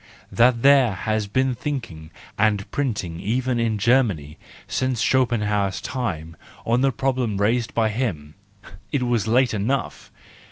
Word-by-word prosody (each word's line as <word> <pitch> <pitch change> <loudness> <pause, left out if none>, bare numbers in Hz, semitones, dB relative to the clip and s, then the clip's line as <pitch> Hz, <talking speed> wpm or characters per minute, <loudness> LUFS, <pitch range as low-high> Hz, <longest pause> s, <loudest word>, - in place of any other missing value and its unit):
That 120 0 +3
there 135 -5 +5
has 110 +3 -2
been 130 +5 +1
thinking 115 - -5 0.3
and 105 -2 0
printing 105 -12 -2
even 125 +3 -1
in 115 -2 0
Germany 100 - +1 0.3
since 130 -2 -1
Schopenhauer's 105 -7 +1
time 85 - -4 0.3
on 120 +2 +2
the 135 0 +3
problem 125 -4 -1
raised 115 +4 0
by 110 -2 +2
him,—it 100 - -5
was 120 -3 0
late 125 +2 +3
enough! 115 +6 -2
115 Hz, 125 wpm, -23 LUFS, 100-130 Hz, 0.3 s, there